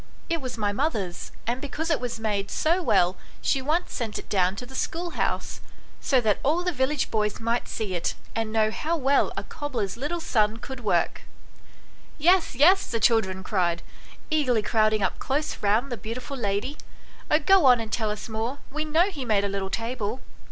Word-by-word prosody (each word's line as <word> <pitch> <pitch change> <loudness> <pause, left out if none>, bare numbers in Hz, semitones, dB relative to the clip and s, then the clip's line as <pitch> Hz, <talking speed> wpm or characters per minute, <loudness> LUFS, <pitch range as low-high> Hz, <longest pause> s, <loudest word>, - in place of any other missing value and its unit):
It 335 -2 0
was 255 -2 -5
my 205 -2 0
mother's, 205 - -2
and 245 +3 -2
because 315 +3 -3
it 310 - +2
was 240 -2 -3
made 205 -2 -1
so 340 +4 +1
well 180 - +3 0.2
she 270 - +1
once 315 +6 0
sent 225 -4 -3
it - - -8
down 185 -1 +2
to 245 - -6
the 260 - -13
schoolhouse, 340 +6 -2 0.4
so 265 - +3
that 215 -3 +2
all 320 +6 +1
the 360 - +1
village 270 0 0
boys 210 -1 0
might 230 +1 -1
see 210 -4 -3
it, 175 -1 -1 0.2
and 225 -1 -1
know 215 -1 +2
how 325 +8 -1
well 275 -1 +3
a - - -2
cobbler's 255 -9 -4
little 300 +7 -2
son 220 -9 +1
could 265 +3 -7
work." 195 -7 +1 0.5
" - - -27
Yes, 360 -7 +3
yes," 360 +9 +5
the 230 - -1
children 205 -4 +2
cried, 175 -4 0 0.5
eagerly 255 -8 +2
crowding 215 -1 +2
up 190 - -1
close 290 +3 -1
round 220 +6 +2
the 240 - -2
beautiful 245 +6 -6
lady; 215 +4 -2 0.3
" - - -24
oh, 300 - +5
go 370 +2 +5
on 250 -2 +7
and 220 -1 -5
tell 220 -3 0
us 210 0 -4
more, 225 +4 -3
we 305 +2 -2
know 325 +6 +2
he 290 -7 -5
made 215 -4 +2
a - - +1
little 195 -1 -3
table." 230 +1 -3
235 Hz, 195 wpm, -26 LUFS, 210-290 Hz, 0.5 s, on